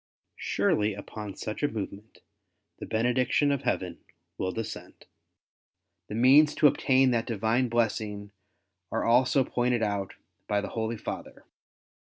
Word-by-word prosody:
Surely 105 -1 +1
upon 100 0 -8
such 110 - -5
a 145 - +3
movement 105 -3 -7 0.6
the - - -7
bene 115 +3 +1
diction 130 +3 +2
of 140 -2 -1
Heaven 90 -9 -2 0.4
will 95 +1 -2
descend. 115 +2 -7 1.0
The 105 - -6
means 140 +6 +6
to - - +2
obtain 130 -2 +4
that 115 -1 0
divine 115 +2 0
blessing 105 -3 -1 0.6
are - - -1
also 130 +3 +4
pointed 120 -2 0
out 100 -2 -2 0.3
by 105 - +1
the 100 - -4
Holy 115 0 -3
Father. - - -7
115 Hz, 135 wpm, -28 LUFS, 105-125 Hz, 1.0 s, means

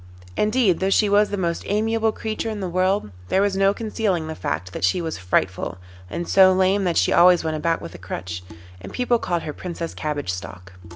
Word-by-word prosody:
Indeed, 215 -4 +2
though 190 - +1
she 205 +1 +3
was 205 +1 +4
the 205 - -3
most 170 -3 -1
amiable 220 +2 +1
creature 220 +1 -4
in 215 -2 -4
the 190 - -3
world, 185 - 0 0.2
there 190 - +2
was 200 -1 0
no 195 0 +4
concealing 210 -5 -1
the 160 - -5
fact 90 - -4
that - - -6
she 90 - +2
was 160 - -4
frightful, 95 0 -1 0.3
and 170 - -4
so 190 -1 +6
lame 190 +1 +2
that 170 -2 0
she - - +3
always 180 0 +6
went 160 -1 -1
about 165 +2 -1
with 85 +1 -8
a 90 - -11
crutch, 90 -1 -6 0.4
and 95 - -9
people 245 -1 +1
called 175 -5 -2
her 150 - -5
Princess 170 -1 -6
Cabbage 145 -10 -3
Stalk. 90 0 -9
180 Hz, 215 wpm, -22 LUFS, 150-205 Hz, 0.4 s, so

